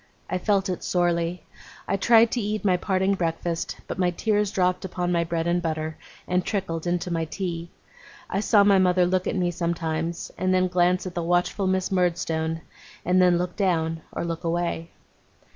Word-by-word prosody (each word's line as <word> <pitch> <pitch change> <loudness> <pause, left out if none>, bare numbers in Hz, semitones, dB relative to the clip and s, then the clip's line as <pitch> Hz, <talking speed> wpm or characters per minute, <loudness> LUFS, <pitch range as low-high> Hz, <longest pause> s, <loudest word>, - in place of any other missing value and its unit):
I 185 - 0
felt 195 0 +1
it 180 -2 -3
sorely. 175 -1 0 0.4
I - - +1
tried 225 +3 +5
to 245 - 0
eat 210 0 -2
my 185 -2 +4
parting 190 +1 +1
breakfast, 170 -2 -2
but - - -5
my 180 -1 +3
tears 210 +3 0
dropped 180 -2 0
upon 180 -1 -2
my 170 -1 +2
bread 165 0 -2
and 175 +1 +1
butter, 160 -1 -3 0.3
and 180 0 +1
trickled 175 -5 -3
into 175 0 -1
my 165 -1 0
tea. 170 0 -4 0.6
I - - -1
saw 205 0 +4
my 200 -1 +5
mother 180 -1 +4
look 185 +1 0
at - - -1
me 180 -2 +1
sometimes, 170 -1 -2
and 185 0 +1
then 185 0 +2
glance 180 +1 +2
at 185 - -5
the 175 - -2
watchful 175 +3 +1
Miss 185 0 0
Murdstone, 165 -3 0 0.4
and 185 +1 +4
than 180 -1 +5
look 180 0 -3
down, 165 -5 0
or - - -3
look 165 -1 -4
away. 170 0 -1
180 Hz, 185 wpm, -25 LUFS, 170-185 Hz, 0.6 s, tried